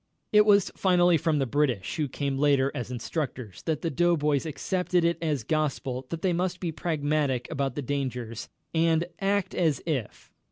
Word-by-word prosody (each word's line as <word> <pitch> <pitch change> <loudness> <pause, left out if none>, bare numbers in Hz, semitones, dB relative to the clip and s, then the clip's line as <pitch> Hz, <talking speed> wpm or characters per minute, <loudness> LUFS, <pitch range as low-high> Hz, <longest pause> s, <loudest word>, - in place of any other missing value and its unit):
It 210 0 +6
was 200 -2 +5
finally 180 -2 +4
from 160 0 +1
the 135 - +1
British, 130 -7 0
who 150 -2 0
came 140 0 -2
later 140 -2 +3
as 120 - -4
instructors, 125 - -4
that 155 -2 0
the 165 - 0
doughboys 150 -2 +2
accepted 180 +2 0
it 170 0 +1
as 150 -7 -1
gospel 135 -3 -2
that 165 -1 -5
they 185 -2 +2
must 180 +1 -1
be 170 -3 -2
pragmatic 150 -5 -1
about 135 -2 -1
the 145 - -3
dangers, 125 -4 -3 0.2
and 165 0 +2
"act 195 -1 0
as 160 -6 +1
if...." 135 -10 -4
150 Hz, 170 wpm, -27 LUFS, 135-170 Hz, 0.2 s, It